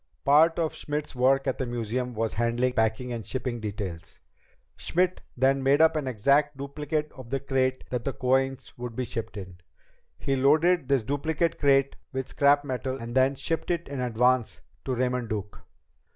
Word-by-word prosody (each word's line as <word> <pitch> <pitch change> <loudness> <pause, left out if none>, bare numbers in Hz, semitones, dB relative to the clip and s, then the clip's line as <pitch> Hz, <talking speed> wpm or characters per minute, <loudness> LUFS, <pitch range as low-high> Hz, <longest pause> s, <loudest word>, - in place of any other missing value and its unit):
Part 155 +4 +5
of 165 -2 0
Schmidt's 150 0 -4
work 135 +2 +3
at 130 - -1
the 130 - -1
museum 120 +1 -3
was 110 0 -1
handling 120 +2 0
packing 110 +2 0
and 115 -2 -4
shipping 125 +2 -4
details. 100 -5 -6 0.6
Schmidt 180 +1 0 0.2
then 135 +2 +3
made 135 +2 +3
up 160 0 +5
an 150 -3 -2
exact 140 +5 +2
duplicate 150 +2 -3
of 130 -4 -12
the 135 +1 -1
crate 130 -1 0
that 125 -2 -2
the 140 - -1
coins 135 0 0
would 120 -2 -5
be 130 - -2
shipped 115 -2 -5
in. 90 -3 -9 0.6
He 135 -1 -1
loaded 155 +4 +3
this 135 -4 +2
duplicate 155 +6 -1
crate 140 -1 +3
with 130 -1 -4
scrap 145 0 +4
metal 130 0 -3
and 130 +3 +1
shipped 165 +4 -2
it 170 -1 -1
in 140 -1 -5
advance 125 0 +1 0.2
to 130 - -1
Raymond 125 -1 -1
Duke. 105 -2 -5
130 Hz, 170 wpm, -27 LUFS, 120-140 Hz, 0.6 s, Part